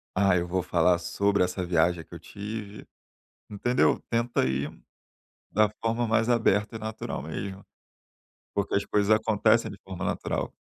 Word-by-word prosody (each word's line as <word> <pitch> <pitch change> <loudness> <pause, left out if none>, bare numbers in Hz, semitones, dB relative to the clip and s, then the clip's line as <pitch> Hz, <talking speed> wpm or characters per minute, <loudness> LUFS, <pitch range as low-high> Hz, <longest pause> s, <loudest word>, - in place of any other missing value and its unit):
ah, 95 -1 +4
eu 85 - -1
vou 90 +1 0
falar 90 0 +3
sobre 100 +1 +1
essa 90 0 -2
viagem 85 0 +2
que - - -17
eu - - -8
tive", 105 +3 -7 0.6
entendeu? 120 +5 +2
Tenta 120 +1 +1
ir 70 +3 -1 0.8
da 110 -1 +4 0.2
forma 115 +1 +1
mais 115 0 +2
aberta 110 -2 +2
e - - -5
natural 110 -10 -5
mesmo. 95 +6 -6 0.9
Porque 100 0 -1
as 100 - +1
coisas 100 0 +1
acontecem 110 +1 +3
de 100 - -10
forma 95 -2 -6
natural. - - -2
100 Hz, 150 wpm, -27 LUFS, 90-110 Hz, 0.9 s, ah